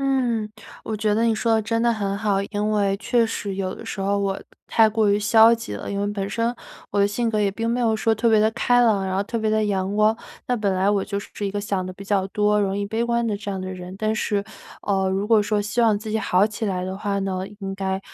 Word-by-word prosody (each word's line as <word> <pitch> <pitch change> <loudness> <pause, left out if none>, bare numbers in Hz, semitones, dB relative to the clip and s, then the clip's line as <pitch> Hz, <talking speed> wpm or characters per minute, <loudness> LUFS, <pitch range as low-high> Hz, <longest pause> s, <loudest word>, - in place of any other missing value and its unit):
嗯， 245 -6 0 0.4
我 220 - -3
觉 210 0 +1
得 225 +2 +2
你 225 -1 +3
说 230 +1 +1
得 220 - +3
真 230 +1 -1
的 235 0 +3
很 200 -2 -2
好， 205 -2 +1
因 210 0 0
为 200 -2 +1
确 230 +1 +2
实 200 -3 -4
有 185 -1 -2
的 - - -11
时 - - -5
候 200 +1 +1
我 195 -1 0
都 - - -15 0.2
太 225 -1 +5
过 215 -1 +2
于 205 - +3
消 225 +2 +6
极 230 - -3
了， 100 - -5
因 200 - -2
为 205 - 0
本 200 -1 -3
身 230 +2 0 0.4
我 205 - +2
的 200 - +4
性 230 +3 -1
格 215 -1 0
也 200 -1 +2
并 225 +4 -3
没 245 +1 0
有 225 -2 +2
说 225 +1 +2
特 230 +2 +1
别 220 - +5
地 215 +1 +4
开 245 +2 +3
朗、 210 -5 +3
然 190 0 -2
后 200 - 0
特 230 - -4
别 220 -1 0
地 215 0 +2
阳 195 -1 -1
光， 215 +1 +4 0.3
那 245 - +1
本 200 -3 0
来 190 +1 +1
我 205 -1 +2
就 200 0 -3
是 205 - -7
一 200 - -1
个 205 +1 -3
想 200 -3 -2
得 185 - -6
比 200 +2 -11
较 195 -1 +1
多、 210 +1 +2
容 195 0 0
易 200 - -2
悲 220 +3 -1
观 235 0 0
的 210 -3 -1
这 205 0 -6
样 190 -1 -3
的 185 0 -5
人， 180 0 -8
但 215 0 0
是， 205 -2 -1 0.4
呃， 195 -2 +1
如 195 +2 -1
果 220 -1 +4
说 205 0 0
希 215 +4 -1
望 220 -3 +4
自 220 - -8
己 - - +1
好 200 -2 +3
起 215 +1 -5
来 185 -3 -1
的 190 +1 -4
话 200 0 -2
呢， 190 -1 -2 0.2
应 195 -2 -5
该 190 0 -2
210 Hz, 305 characters per minute, -23 LUFS, 195-220 Hz, 0.4 s, 消